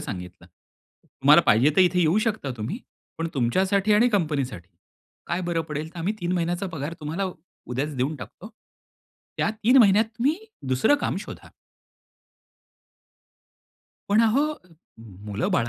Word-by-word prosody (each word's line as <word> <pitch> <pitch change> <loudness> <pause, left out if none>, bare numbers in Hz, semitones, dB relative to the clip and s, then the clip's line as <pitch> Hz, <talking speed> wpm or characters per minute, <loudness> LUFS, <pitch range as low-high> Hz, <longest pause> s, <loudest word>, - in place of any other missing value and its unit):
सांगितलं, 90 -1 -8 0.6
"तुम्हाला 150 +5 +5
पाहिजे 125 +8 +5
तर - - +6
इथे 180 0 +3
येऊ 170 +4 +3
शकता 215 -11 -2
तुम्ही, 115 - -4 0.4
पण 165 0 -2
तुमच्यासाठी 190 - +1
आणि 235 +4 +5
कंपनीसाठी 145 - -2 0.6
काय 175 - -2
बरं 175 -2 -1
पडेल 150 +1 -4
तर - - -8
आम्ही 190 +6 -1
3 175 +1 -1
महिन्याचा 175 +2 -1
पगार 155 +2 -4
तुम्हाला 160 +6 -3 0.4
उद्याच 140 +4 -3
देऊन 135 +5 -1
टाकतो, 205 +7 -10 0.9
त्या - - +1
3 220 +4 +2
महिन्यात 210 -2 +6
तुम्ही 280 +7 +1 0.3
दुसरं 130 - +3
काम - - -1
शोधा." - - -10 2.6
पण 210 +3 +4
अहो, 230 +4 +3 0.9
मुलं 105 +1 -2
बाळ 115 - +1
170 Hz, 135 wpm, -24 LUFS, 135-200 Hz, 2.6 s, तर